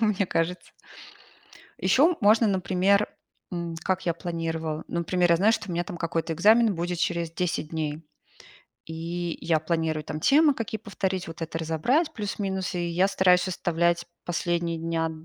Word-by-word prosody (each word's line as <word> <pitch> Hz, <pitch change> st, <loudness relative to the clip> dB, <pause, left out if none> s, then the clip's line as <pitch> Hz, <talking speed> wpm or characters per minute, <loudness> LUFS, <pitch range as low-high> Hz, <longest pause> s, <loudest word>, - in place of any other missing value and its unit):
мне 210 Hz, -3 st, +2 dB
кажется. 170 Hz, +2 st, -2 dB, 1.1 s
Ещё 320 Hz, +6 st, +4 dB
можно, 220 Hz, +2 st, +5 dB
например, 190 Hz, +1 st, +2 dB, 0.4 s
м, 170 Hz, -2 st, -4 dB
как 185 Hz, -1 st, -1 dB
я 170 Hz, -, +1 dB
планировала. 165 Hz, -2 st, -4 dB
Например, 175 Hz, +1 st, +1 dB
я -, -, +5 dB
знаю, 205 Hz, +5 st, +4 dB
что 215 Hz, -, -2 dB
у -, -, -3 dB
меня 175 Hz, +1 st, -1 dB
там 180 Hz, -4 st, -7 dB
какой-то 165 Hz, -1 st, -2 dB
экзамен 215 Hz, +4 st, +4 dB
будет 175 Hz, +1 st, -3 dB
через 170 Hz, -1 st, -1 dB
10 165 Hz, -3 st, -2 dB
дней. 155 Hz, -1 st, -3 dB, 0.8 s
И 170 Hz, +1 st, -4 dB
я 160 Hz, -2 st, +1 dB
планирую 160 Hz, -1 st, -1 dB
там 155 Hz, -, -5 dB
темы, 295 Hz, -, +5 dB
какие 225 Hz, -4 st, -4 dB
повторить, 190 Hz, -3 st, -3 dB
вот 165 Hz, 0 st, -9 dB
это 165 Hz, 0 st, -4 dB
разобрать 240 Hz, -, +1 dB
плюс-минус. 195 Hz, -, -3 dB
И 175 Hz, -1 st, -1 dB
я 180 Hz, +3 st, +2 dB
стараюсь 185 Hz, -1 st, +3 dB
оставлять 170 Hz, -1 st, 0 dB, 0.2 s
последние 170 Hz, -1 st, -1 dB
дня 165 Hz, 0 st, -1 dB
175 Hz, 155 wpm, -26 LUFS, 165-195 Hz, 1.1 s, можно